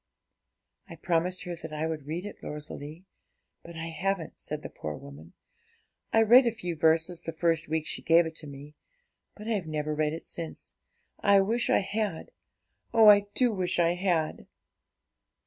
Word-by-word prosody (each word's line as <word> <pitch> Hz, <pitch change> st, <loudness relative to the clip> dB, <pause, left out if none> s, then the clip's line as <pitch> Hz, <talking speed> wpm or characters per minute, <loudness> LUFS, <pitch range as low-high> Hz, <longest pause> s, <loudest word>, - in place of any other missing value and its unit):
'I 165 Hz, -, -8 dB
promised 175 Hz, +2 st, 0 dB
her 175 Hz, -2 st, -5 dB
that 160 Hz, -1 st, -8 dB
I 155 Hz, +1 st, -2 dB
would 155 Hz, -3 st, -4 dB
read 170 Hz, +5 st, -4 dB
it, 205 Hz, -, -8 dB
Rosalie; 150 Hz, +3 st, -8 dB, 0.6 s
but 170 Hz, -, -12 dB
I 165 Hz, 0 st, -5 dB
haven't,' 180 Hz, +1 st, -3 dB
said -, -, -5 dB
the -, -, -6 dB
poor 75 Hz, -1 st, -6 dB
woman. 70 Hz, +4 st, -12 dB, 0.8 s
'I 225 Hz, -, +5 dB
read 240 Hz, +3 st, +7 dB
a -, -, +3 dB
few 180 Hz, -6 st, -5 dB
verses 160 Hz, +2 st, +2 dB
the 165 Hz, -, -5 dB
first 165 Hz, 0 st, 0 dB
week 160 Hz, 0 st, -1 dB
she -, -, -4 dB
gave 165 Hz, +1 st, +5 dB
it 160 Hz, -, -5 dB
to 155 Hz, -, -7 dB
me, 145 Hz, +1 st, -10 dB, 0.6 s
but 210 Hz, +1 st, -10 dB
I've 205 Hz, -7 st, -1 dB
never 155 Hz, -1 st, -2 dB
read 150 Hz, 0 st, 0 dB
it 165 Hz, -, -7 dB
since. 165 Hz, -2 st, -4 dB, 0.5 s
I 200 Hz, 0 st, +5 dB
wish 230 Hz, +5 st, 0 dB
I -, -, +4 dB
had 205 Hz, -3 st, -3 dB, 0.6 s
oh, 225 Hz, -2 st, +7 dB
I 205 Hz, -1 st, +6 dB
do 245 Hz, -3 st, +3 dB
wish 185 Hz, -2 st, 0 dB
I 170 Hz, 0 st, +3 dB
had!' 175 Hz, -4 st, -1 dB
165 Hz, 175 wpm, -28 LUFS, 155-195 Hz, 0.8 s, read